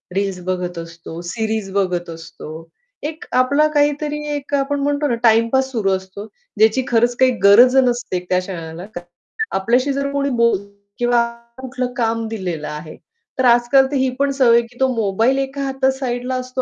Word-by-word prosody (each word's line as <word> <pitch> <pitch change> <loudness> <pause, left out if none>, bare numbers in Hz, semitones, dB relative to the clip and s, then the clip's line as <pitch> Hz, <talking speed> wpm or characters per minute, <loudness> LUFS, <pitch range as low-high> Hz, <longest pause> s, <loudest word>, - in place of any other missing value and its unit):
Reels 195 -2 -1
बघत 180 -2 -3
असतो, 165 0 -8
series 220 +2 -3
बघत 180 -3 -1
असतो. 165 0 -10 0.3
एक 315 +1 -5
आपला 280 +4 +3
काहीतरी 295 +1 +1 0.2
एक 285 0 -7
आपण 280 +1 0
म्हणतो 290 +1 0
ना 240 - 0
टाईमपास 230 +4 +3
सुरु 205 -5 0
असतो, 190 +2 -4 0.3
ज्याची 220 +4 +3
खरंच 240 +1 +2
काही 260 -1 +5
गरज 240 +6 +7
नसते 245 -7 +1
त्या 180 - +3
क्षणाला. 175 -2 -7 0.7
आपल्याशी 245 +8 +1
जर 280 0 -2
कोणी 280 0 0
बोलतो 230 -5 0 0.3
किंवा 240 -1 +3 0.4
कुठलं 255 -1 -4
काम 230 -1 0
दिलेलं 180 -8 -4
आहे, 150 +1 -7 0.4
तर 260 - +3
आज-काल 240 +3 +5
तर - - -1
ही 260 -1 +2
पण 280 0 +2
सवय 250 -4 +4
आहे 235 - +1
की 245 +1 -21
तो 265 - +3
मोबाईल 225 +5 +1
एका 275 +1 -3
हातात 265 0 +1
साइडला 250 0 -2
असतो. 255 0 -3
240 Hz, 165 wpm, -19 LUFS, 195-265 Hz, 0.7 s, गरज